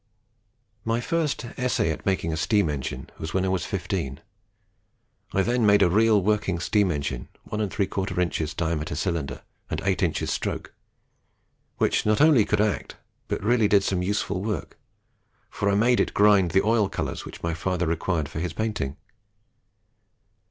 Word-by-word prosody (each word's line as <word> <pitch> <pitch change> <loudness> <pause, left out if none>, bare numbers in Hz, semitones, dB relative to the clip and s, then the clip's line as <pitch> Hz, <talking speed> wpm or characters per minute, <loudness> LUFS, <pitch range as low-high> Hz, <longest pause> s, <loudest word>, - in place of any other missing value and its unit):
"My 115 +1 0
first 160 -2 -1
essay 125 -8 +1
at 80 - -6
making 90 -4 0
a - - 0
steam 100 0 +2
engine 65 -2 -5
was 80 +3 -5
when 95 0 +2
I - - 0
was 95 -2 -1
fifteen. 85 -7 -3 1.1
I 95 - +2
then 120 +2 +1
made 100 -1 +5
a 85 - +3
real 110 0 +4
working; 100 -3 +1
steam 100 +2 +2
engine, 70 -6 -3 0.2
1 105 - -5
3/4 90 -5 -1
diameter 80 -3 -1
cylinder, 85 -4 -2 0.3
and - - -2
8 - - +1
in. - - +2
stroke, - - -3 1.0
which - - +2
not 105 0 +2
only 145 -8 +6
could 105 0 +1
act, 105 -1 -1 0.3
but - - -3
really 115 0 +3
did 100 -1 +4
some 95 -2 0
useful 100 0 -1
work; 105 -8 -4 0.7
for 100 - 0
I 100 - +2
made 120 +4 +3
it - - 0
grind 100 -3 +5
the 95 +4 +3
oil 110 -3 +3
colours - - -4
which - - -10
my 85 0 0
father 90 +2 -1
required 80 -1 -1
for 80 - -6
his 85 0 -3
painting. 105 -11 -2
95 Hz, 160 wpm, -25 LUFS, 85-105 Hz, 1.1 s, only